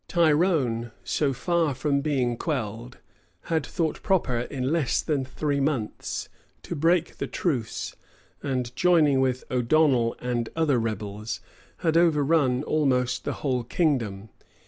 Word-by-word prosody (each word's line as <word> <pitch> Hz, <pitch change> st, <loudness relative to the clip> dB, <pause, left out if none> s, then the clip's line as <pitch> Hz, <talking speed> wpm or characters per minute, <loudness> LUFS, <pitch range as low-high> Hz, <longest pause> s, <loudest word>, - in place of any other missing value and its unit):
Tyrone, 150 Hz, -8 st, +2 dB
so 145 Hz, -3 st, 0 dB
far 160 Hz, +2 st, 0 dB
from 140 Hz, +2 st, 0 dB
being 130 Hz, -5 st, 0 dB
quelled, 120 Hz, -3 st, -4 dB, 0.6 s
had 160 Hz, -2 st, +2 dB
thought 160 Hz, 0 st, -2 dB
proper, 165 Hz, -, +1 dB
in 130 Hz, +2 st, -2 dB
less 160 Hz, -7 st, +1 dB
than 145 Hz, -4 st, 0 dB
three 140 Hz, +2 st, -2 dB
months, 135 Hz, -6 st, -2 dB, 0.4 s
to -, -, -5 dB
break 170 Hz, +3 st, +1 dB
the -, -, -2 dB
truce, 130 Hz, -11 st, -2 dB, 0.5 s
and 125 Hz, -3 st, -2 dB
joining 155 Hz, -6 st, +4 dB
with 130 Hz, -1 st, 0 dB
O'Donnel 125 Hz, -1 st, +3 dB
and 120 Hz, -2 st, -2 dB
other 155 Hz, -6 st, +2 dB
rebels, 110 Hz, -1 st, -4 dB, 0.5 s
had 165 Hz, 0 st, +3 dB
overrun 150 Hz, -5 st, +3 dB
almost 130 Hz, -5 st, +1 dB
the -, -, -1 dB
whole 125 Hz, -3 st, +1 dB
kingdom. 115 Hz, -, -1 dB
135 Hz, 125 wpm, -26 LUFS, 120-155 Hz, 0.6 s, joining